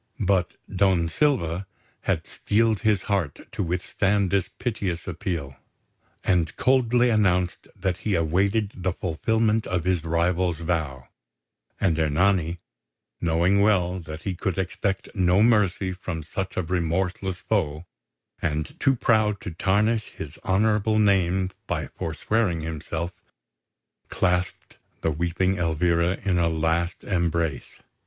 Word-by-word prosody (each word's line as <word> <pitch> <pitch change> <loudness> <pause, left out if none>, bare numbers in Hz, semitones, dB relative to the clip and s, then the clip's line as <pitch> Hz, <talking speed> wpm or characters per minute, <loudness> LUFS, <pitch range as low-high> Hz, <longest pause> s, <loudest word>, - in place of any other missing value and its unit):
But 95 -2 +1 0.2
Don 95 -3 +3
Silva 95 - +1 0.4
had - - 0
steeled 110 0 +1
his 105 -4 +2
heart 95 -8 -1
to - - -3
withstand 95 +2 0
this 100 -2 +1
piteous 95 -8 -3
appeal, 70 -7 -4 0.7
and 85 -4 +1
coldly 125 -2 +3
announced 90 -5 +1
that 95 -2 -1
he 105 0 -1
awaited 100 +6 +1
the 95 0 -1
fulfilment 110 +6 0
of 90 -3 -1
his 90 -3 +1
rival's 85 +1 +1
vow; 80 -6 -2 0.7
and 85 -4 +2
Ernani, 85 +2 +2 0.6
knowing 85 +4 +3
well 95 -3 +2
that 80 -1 -8
he 95 - -2
could 90 +1 -2
expect 95 +1 -2
no 95 0 +3
mercy 100 -5 +3
from 90 -3 -5
such 95 +4 -5
a 95 - +1
remorseless 90 +2 -1
foe, 90 -6 -1 0.6
and 75 0 -2
too 135 -1 +3
proud 110 -4 +2
to 90 - -5
tarnish 105 +6 +1
his - - -7
honourable 105 +2 +2
name 95 -3 +2 0.2
by - - -1
forswearing 85 +2 -1
himself, 80 +2 -4 1.0
clasped 90 -1 -1 0.2
the 80 - +1
weeping 85 +4 0
Elvira 85 +2 +1
in 95 -3 +1
a 85 -1 +3
last 80 +2 0
embrace. 85 -3 -1
90 Hz, 125 wpm, -25 LUFS, 85-100 Hz, 1.0 s, Don